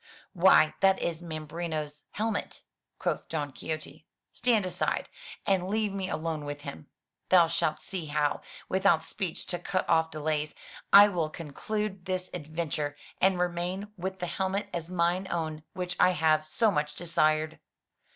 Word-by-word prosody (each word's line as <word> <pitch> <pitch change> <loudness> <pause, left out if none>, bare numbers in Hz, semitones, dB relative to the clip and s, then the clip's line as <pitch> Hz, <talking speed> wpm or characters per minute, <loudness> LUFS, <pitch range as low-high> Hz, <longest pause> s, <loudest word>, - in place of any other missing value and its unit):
"Why, 175 -4 +6
that 190 0 +5
is 170 -1 -2
Mambrino's 155 -2 -5
helmet," 220 0 -3 0.3
quoth - - -2
Don 150 -3 -2
Quixote. 155 +1 -6 0.3
"Stand 230 -5 +2
aside, 185 - -1 0.4
and 190 -2 +2
leave 210 0 0
me 190 -1 -2
alone 160 -1 -2
with 145 0 -5
him. 80 - -8 0.4
Thou 180 -2 +7
shalt 155 -2 0
see 180 -5 -5
how, 145 -1 0 0.3
without 185 -4 +3
speech 175 0 -3
to 175 - -2
cut 185 +2 -1
off 160 0 +3
delays, 155 -1 -2 0.4
I 200 +1 +10
will 170 -5 -1
conclude 190 +6 -4
this 185 0 -3
adven 155 +1 -4
ture, 145 -1 -2 0.2
and 190 -1 +4
remain 180 +3 -1
with 190 0 -4
the 180 - -3
helmet 190 +3 -1
as 170 -1 -4
mine 180 +1 +1
own 160 -2 -2
which 180 -1 -3
I 185 - +6
have 155 -1 +2
so 215 +7 +2
much 150 -3 -1
desired." 155 -2 +1
170 Hz, 150 wpm, -29 LUFS, 155-190 Hz, 0.4 s, I